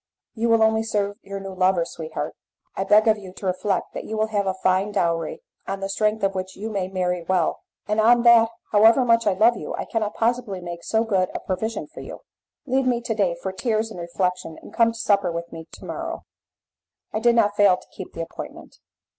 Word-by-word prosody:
"You 230 +1 -1
will 230 -1 +5
only 220 0 +3
serve 205 -2 -1
your 200 0 -6
new 195 -1 -7
lover, 185 -2 +2
sweetheart. 155 -2 -5 0.4
I 195 - -1
beg 215 +2 +5
of 215 -1 +4
you 190 -2 -10
to 195 - -9
reflect 185 +1 -1
that - - -5
you 220 - -5
will 215 0 +1
have 205 -2 0
a 190 - 0
fine 190 +2 +1
dowry, 170 - -1 0.2
on 195 0 -3
the 195 0 -4
strength 215 +2 0
of 195 0 +2
which 185 0 -5
you 220 +3 -5
may 195 -3 -1
marry 180 -2 -1
well; 180 -1 +1 0.3
and 210 +1 0
that 235 0 +6 0.2
however 225 +4 +6
much 230 -2 +3
I 200 - +4
love 225 +5 +4
you - - -5
I - - -4
cannot 215 -2 -2
possibly 230 -4 0
make 175 -1 -7
so 220 0 +1
good 190 -5 +1
a - - -1
provision 220 +4 -3
for - - -13
you." - - -9 0.4
"Leave 265 -1 +1
me 245 -2 +2
to 235 -1 -2
day 195 -5 +1
for 190 - -2
tears 220 +2 -1
and 180 - -8
reflection, 180 -1 -2
and - - -13
come 230 -1 +4
to 230 - -10
supper 200 -5 +2
with 170 0 -5
me 160 0 -9
to - - -11
morrow." - - -5 0.9
I 215 - 0
did 235 +1 +4
not 210 -3 +3
fail 200 -3 +5
to - - -17
keep 190 - -8
the 165 - -5
appointment. 165 - -10
205 Hz, 220 wpm, -23 LUFS, 185-225 Hz, 0.9 s, that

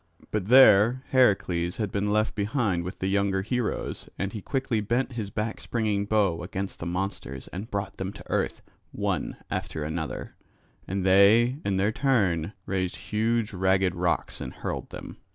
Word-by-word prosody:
But 105 -3 -1
there 125 0 +7
Heracles 95 -8 +2
had 105 -3 -2
been 105 0 0
left 110 +1 +1
behind 105 -4 0
with 90 - -6
the - - -3
younger 100 -1 +1
heroes 120 +1 -2
and 95 +2 -3
he 105 - -5
quickly 130 -4 -1
bent 120 +6 0
his 110 -5 -4
back 110 +2 -3
springing 105 -4 -1
bow 100 -5 +1
against 95 +2 -5
the 85 - -4
monsters 95 +3 -4
and 100 +5 -6
brought 100 -1 -3
them 95 0 -3
to - - -12
earth - - -1 0.3
one - - -2
after 80 - -3
another; 80 +1 -4 0.5
and 95 0 -2
they 105 +7 +5
in 100 -1 0
their 100 +3 +2
turn 100 - +1
raised 95 -2 -1 0.2
huge 110 0 +1
ragged 95 0 +2
rocks 85 -1 -1
and - - -5
hurled - - -5
them. - - -9
100 Hz, 165 wpm, -27 LUFS, 95-110 Hz, 0.5 s, there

